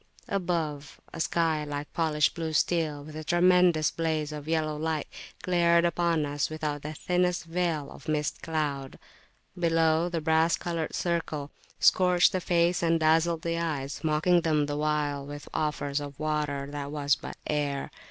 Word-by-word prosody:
Above, 165 -6 -2
a 165 - -7
sky 160 -2 +1
like 145 0 -5
polished 155 -2 +2
blue 165 -2 -4
steel, 155 -3 +1
with 155 +1 -10
a 155 - -5
tremendous 175 -2 +4
blaze 155 -2 -1
of 150 0 -7
yellow 155 -1 0
light, 155 0 -2 0.4
glared 170 -1 +3
upon 170 -2 +1
us 145 0 -1
without 150 -2 -3
the 150 +2 -5
thinnest 180 +2 0
veil 165 -3 -1
of - - -13
mist 150 -1 -1
cloud. 145 -4 -3 0.6
Below, 165 0 +2
the 170 -1 -2
brass 160 +1 +2
coloured 170 -2 -3
circle 160 -4 -2 0.3
scorched 180 -1 +5
the 185 - -1
face 175 0 +2
and 165 -1 +2
dazzled 160 +1 +2
the 165 0 -1
eyes, 145 -5 -3
mocking 160 +3 +3
them 155 -3 +2
the 145 0 -3
while 150 -1 0
with 145 +1 -8
offers 150 -2 -1
of 145 -1 -8
water 150 -2 -1
that 145 -1 -5
was 145 -2 +2
but - - -9
air. 145 -2 -2
155 Hz, 160 wpm, -28 LUFS, 150-170 Hz, 0.6 s, scorched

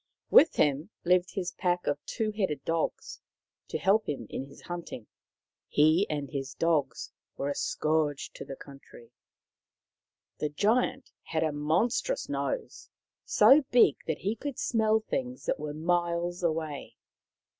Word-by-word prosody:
With 320 - +7
him 145 +4 +1
lived 180 +1 +2
his 185 -2 -2
pack 180 -2 -1
of 145 0 -1
two 220 -1 -1
headed 190 -10 -2
dogs, 165 -1 -2 0.5
to - - -3
help 210 +3 +2
him 135 -6 -3
in 135 - -4
his 140 - -15
hunting. 170 -10 -7 0.6
He 155 +7 +4
and 145 -2 -2
his 135 -1 -4
dogs 150 -7 0 0.3
were 140 - -2
a - - 0
scourge 150 -1 -1
to - - -8
the 135 - -7
country. 135 -4 -14 1.3
The 150 - -1
Giant 240 - 0
had 160 -1 -2
a 155 - +1
monstrous 175 - 0
nose, - - -4 0.4
so 280 +3 +6
big 240 - +5
that 160 - -1
he 205 +4 -2
could 280 +3 -5
smell 220 -1 +2
things 255 +3 -4
that - - -1
were 150 0 -4
miles 175 +2 -1
away. 160 -4 -2
170 Hz, 145 wpm, -29 LUFS, 145-210 Hz, 1.3 s, With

